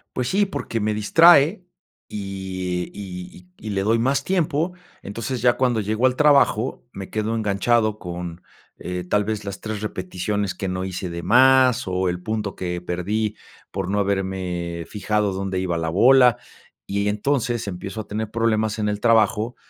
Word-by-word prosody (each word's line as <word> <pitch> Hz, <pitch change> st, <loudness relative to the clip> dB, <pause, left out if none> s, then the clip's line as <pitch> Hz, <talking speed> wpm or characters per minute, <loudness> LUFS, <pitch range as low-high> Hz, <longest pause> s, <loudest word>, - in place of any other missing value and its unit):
Pues 125 Hz, -1 st, -1 dB
sí 200 Hz, +1 st, +2 dB
porque 115 Hz, -, -4 dB
me 105 Hz, 0 st, 0 dB
distrae 165 Hz, -, +5 dB, 0.4 s
y 95 Hz, -3 st, -4 dB
y 90 Hz, -3 st, -8 dB, 0.2 s
y 110 Hz, -, -11 dB
y -, -, -3 dB
le 95 Hz, -1 st, -1 dB
doy 115 Hz, +3 st, +2 dB
más 135 Hz, +3 st, +1 dB
tiempo, 170 Hz, -2 st, 0 dB, 0.3 s
entonces 115 Hz, +4 st, -4 dB
ya 120 Hz, -1 st, +4 dB
cuando 120 Hz, -3 st, +1 dB
llego 110 Hz, +5 st, +1 dB
al 130 Hz, 0 st, +1 dB
trabajo, 140 Hz, -7 st, +3 dB
me 95 Hz, -1 st, -8 dB
quedo 110 Hz, +1 st, -1 dB
enganchado 110 Hz, +1 st, +1 dB
con, 90 Hz, -1 st, -7 dB, 0.4 s
eh, 90 Hz, 0 st, -5 dB
tal 105 Hz, 0 st, +2 dB
vez 105 Hz, -1 st, -3 dB
las 100 Hz, -1 st, -6 dB
3 110 Hz, -1 st, -5 dB
repeticiones 95 Hz, 0 st, -3 dB
que 95 Hz, -, -4 dB
no 90 Hz, 0 st, -3 dB
hice 90 Hz, -1 st, -4 dB
de 85 Hz, 0 st, -5 dB
más 130 Hz, 0 st, +5 dB
o 95 Hz, 0 st, 0 dB
el 90 Hz, 0 st, -3 dB
punto 105 Hz, -1 st, -3 dB
que 90 Hz, -1 st, -3 dB
perdí 105 Hz, +5 st, -2 dB, 0.3 s
por 95 Hz, -2 st, -4 dB
no 105 Hz, -, 0 dB
haberme 95 Hz, -4 st, -2 dB
fijado 105 Hz, -1 st, -1 dB
dónde 95 Hz, -1 st, -3 dB
iba 90 Hz, -2 st, -1 dB
la 80 Hz, -1 st, -2 dB
bola 125 Hz, +5 st, +5 dB, 0.5 s
y 100 Hz, +1 st, -1 dB
entonces 120 Hz, 0 st, -1 dB
empiezo 100 Hz, +4 st, -5 dB
a -, -, -22 dB
tener 110 Hz, +1 st, -3 dB
problemas 110 Hz, -1 st, 0 dB
en 105 Hz, -1 st, 0 dB
el 105 Hz, 0 st, -2 dB
trabajo 110 Hz, 0 st, +2 dB
105 Hz, 170 wpm, -22 LUFS, 95-115 Hz, 0.5 s, distrae